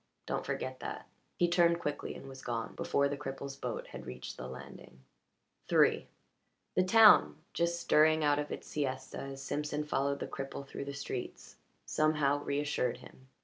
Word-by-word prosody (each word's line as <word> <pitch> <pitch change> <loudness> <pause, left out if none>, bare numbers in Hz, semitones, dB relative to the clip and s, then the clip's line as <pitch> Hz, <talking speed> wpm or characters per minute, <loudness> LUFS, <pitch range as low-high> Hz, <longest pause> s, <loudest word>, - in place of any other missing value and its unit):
Don't - - -3
forget 130 0 -3
that." - - -6 0.3
He 175 - +4
turned 170 -1 +4
quickly 150 -3 -3
and - - -10
was 135 -1 -10
gone 115 -2 -3
before 140 0 +1
the 140 - -2
cripple's 135 -1 -5
boat 140 - -4
had - - -9
reached 65 - -7
the 65 - -7
landing. 65 0 -11 0.7
III - - +4 0.7
The 185 - +3
town, 215 0 +7 0.2
just 170 0 0
stirring 155 -1 +4
out 145 0 +3
of 150 - -3
its - - -5
siesta 130 -3 -3
as 135 0 -6
Simpson 150 +1 -2
followed 140 -1 0
the - - -3
cripple 135 0 -6
through 140 - -6
the 140 - -5
streets, 135 -3 -6 0.3
somehow 150 -2 +2
reassured 140 -3 0
him. 130 - -15
140 Hz, 165 wpm, -32 LUFS, 135-155 Hz, 0.7 s, town